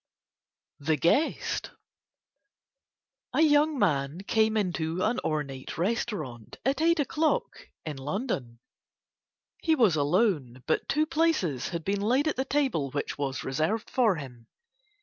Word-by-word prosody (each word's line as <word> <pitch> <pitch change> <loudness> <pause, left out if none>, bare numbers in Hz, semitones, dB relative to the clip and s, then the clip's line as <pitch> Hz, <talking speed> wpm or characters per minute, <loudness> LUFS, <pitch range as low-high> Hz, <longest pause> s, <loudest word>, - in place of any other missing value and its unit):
THE 155 +2 +1
GUEST 220 - +1 1.7
A - - +4
young 300 -1 +4
man 150 - 0
came 220 +1 +2
into 175 -3 -1
an 235 +3 +1
ornate 145 -4 -3
restaurant 170 - -3
at 275 +3 +1
eight 335 0 +3
o'clock 315 - -1 0.2
in 150 -3 -4
London. 135 - -3 1.0
He 320 -1 +2
was 225 - +4
alone, 145 - +1
but - - 0
two 305 +1 +2
places 305 - 0
had 170 -2 -4
been 200 0 0
laid 255 +8 +2
at 310 - 0
the 265 - -1
table 265 - 0
which 145 +1 -4
was 135 -2 -2
reserved 155 +11 -1
for 230 -7 +3
him. 125 -6 -9
190 Hz, 130 wpm, -28 LUFS, -, 1.7 s, A